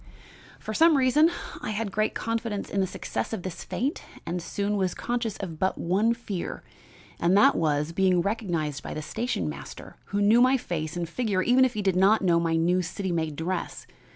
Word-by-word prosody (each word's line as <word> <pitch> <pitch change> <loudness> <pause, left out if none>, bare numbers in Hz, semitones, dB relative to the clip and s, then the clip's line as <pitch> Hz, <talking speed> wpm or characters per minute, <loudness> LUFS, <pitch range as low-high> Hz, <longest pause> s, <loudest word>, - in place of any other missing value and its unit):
"For 215 - -5
some 320 +5 +5
reason 275 +5 +4 0.3
I - - -4
had 215 -1 -2
great 215 +2 0
confidence 230 -2 -3
in 200 - 0
the 190 - +1
success - - -4
of 190 - -4
this 185 -3 -6
feint 275 +7 -2 0.2
and 175 +1 -3
soon 200 +4 -2
was 190 -2 0
conscious 235 -3 -2
of 165 -5 -6
but 190 - 0
one 205 +7 +1
fear, 205 -6 -5 0.6
and 175 +3 +3
that 275 +7 +6
was 150 0 0
being 185 0 +3
recognized 170 -8 -2
by - - -6
the 155 - -4
station 235 +10 -2
master, - - -8
who 200 - -2
knew 215 +4 +5
my 255 +2 +5
face 165 -8 -4
and 170 -1 -2
figure 200 0 -1
even 250 +4 +5
if 250 -2 -2
he 210 - -2
did 190 -2 +2
not 195 +4 +4
know 170 -2 +4
my 165 -1 0
new 175 +3 +2
city 185 +2 -4
made 160 -3 -1
dress. 170 +3 -4
195 Hz, 200 wpm, -26 LUFS, 170-225 Hz, 0.6 s, that